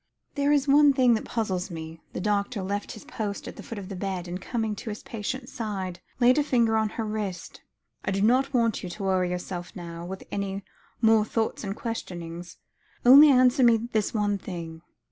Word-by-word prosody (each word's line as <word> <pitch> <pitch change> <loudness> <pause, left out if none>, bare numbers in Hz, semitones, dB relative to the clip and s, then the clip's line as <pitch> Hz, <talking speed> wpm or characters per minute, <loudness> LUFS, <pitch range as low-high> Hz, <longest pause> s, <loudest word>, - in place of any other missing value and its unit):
"There 285 +1 +1
is 290 -1 +3
one 285 0 +6
thing 255 -3 +4
that 220 - -1
puzzles 190 -5 -2
me,"; 160 -1 -8
the - - -4
doctor 205 +2 -1
left 200 +2 -3
his 215 - -12
post 205 -2 -4
at - - -7
the - - -9
foot 230 - -8
of 195 -2 -6
the 195 - -6
bed, 185 -1 -3
and, 180 +2 -5
coming 220 -1 -2
to 225 - -6
his 210 - -6
patient's 245 +4 -5
side, 195 -6 -4 0.2
laid 250 +3 +5
a - - +3
finger 235 -5 +2
on 220 -1 +2
her 225 - -1
wrist. 210 -4 -5 0.4
"I - - -2
do 195 +1 0
not 260 +5 +3
want 230 -4 +1
you 180 - -6
to 200 +3 -7
worry 185 -2 +1
yourself 180 0 -5
now, 170 -2 -7
with 190 +2 -7
any 200 0 -3 0.4
more 220 -1 +6
thoughts 220 +1 -2
and 195 -1 -3
questionings. 175 -7 -6 0.5
Only 280 +5 +10
answer 255 0 +5
me 235 -1 +6
this 225 -2 -1
one 205 -2 0
thing. 165 -3 -7
210 Hz, 200 wpm, -26 LUFS, 185-235 Hz, 0.5 s, Only